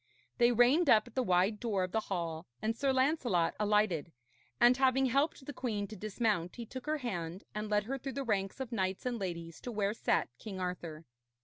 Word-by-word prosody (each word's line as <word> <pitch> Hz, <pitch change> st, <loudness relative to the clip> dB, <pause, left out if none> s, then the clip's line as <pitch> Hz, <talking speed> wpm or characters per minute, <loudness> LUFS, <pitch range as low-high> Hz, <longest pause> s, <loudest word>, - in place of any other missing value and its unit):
They 240 Hz, 0 st, +6 dB
reined 255 Hz, +7 st, +4 dB
up 215 Hz, -3 st, +6 dB
at 240 Hz, -, -14 dB
the 260 Hz, -, +1 dB
wide 190 Hz, 0 st, +2 dB
door 205 Hz, -5 st, 0 dB
of 185 Hz, -, -3 dB
the 220 Hz, -, +1 dB
hall, 170 Hz, -6 st, -4 dB
and 220 Hz, +1 st, -1 dB
Sir 275 Hz, +2 st, +1 dB
Lancelot 260 Hz, -, +2 dB
alighted, 210 Hz, -6 st, +2 dB, 0.5 s
and 240 Hz, +1 st, +7 dB
having 265 Hz, 0 st, +3 dB
helped 275 Hz, +2 st, +1 dB
the 290 Hz, -, -6 dB
queen 215 Hz, -7 st, -2 dB
to 220 Hz, -, -7 dB
dismount, 210 Hz, -3 st, -1 dB
he 235 Hz, -, -6 dB
took 260 Hz, +5 st, -8 dB
her 310 Hz, 0 st, +1 dB
hand, 185 Hz, -, -4 dB
and 210 Hz, 0 st, -4 dB
led 210 Hz, 0 st, +2 dB
her 270 Hz, +5 st, -4 dB
through 270 Hz, +1 st, -5 dB
the 275 Hz, -, -3 dB
ranks 200 Hz, -2 st, -1 dB
of 260 Hz, -2 st, -4 dB
knights 190 Hz, -2 st, -1 dB
and 245 Hz, -2 st, -1 dB
ladies 170 Hz, -3 st, -5 dB
to 245 Hz, -, -5 dB
where 205 Hz, -2 st, 0 dB
sat -, -, +1 dB
King 195 Hz, -4 st, -7 dB
Arthur. 170 Hz, -3 st, -5 dB
215 Hz, 210 wpm, -33 LUFS, 185-255 Hz, 0.5 s, and